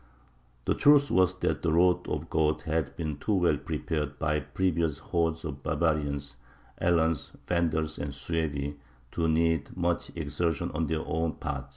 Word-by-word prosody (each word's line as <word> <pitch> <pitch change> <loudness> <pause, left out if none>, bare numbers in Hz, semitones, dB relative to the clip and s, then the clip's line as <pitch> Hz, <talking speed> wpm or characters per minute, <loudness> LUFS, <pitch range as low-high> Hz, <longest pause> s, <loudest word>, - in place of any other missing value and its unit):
The - - +3
truth 145 -1 +5
was 90 0 +4
that - - 0
the 85 - +1
road 90 +2 +3
of - - -1
the - - -11
Goths 75 -1 +1
had 80 -4 -1
been 75 -4 -3
too 105 - 0
well 90 -2 +3
prepared 75 -2 -3
by 75 -1 +1
previous 85 -4 0
hordes 80 +1 -1
of 70 -3 -5
barbarians 75 -2 -1 0.4
Alans, 80 -3 +1
Vandals, 80 -3 0
and 70 0 -3
Suevi 70 0 -2 0.3
to 85 -1 0
need 80 -1 +1
much 85 -1 0
exertion 80 +1 -1
on 80 +1 -1
their 80 0 -1
own 80 0 -1
part. - - -4
80 Hz, 160 wpm, -29 LUFS, 75-85 Hz, 0.4 s, truth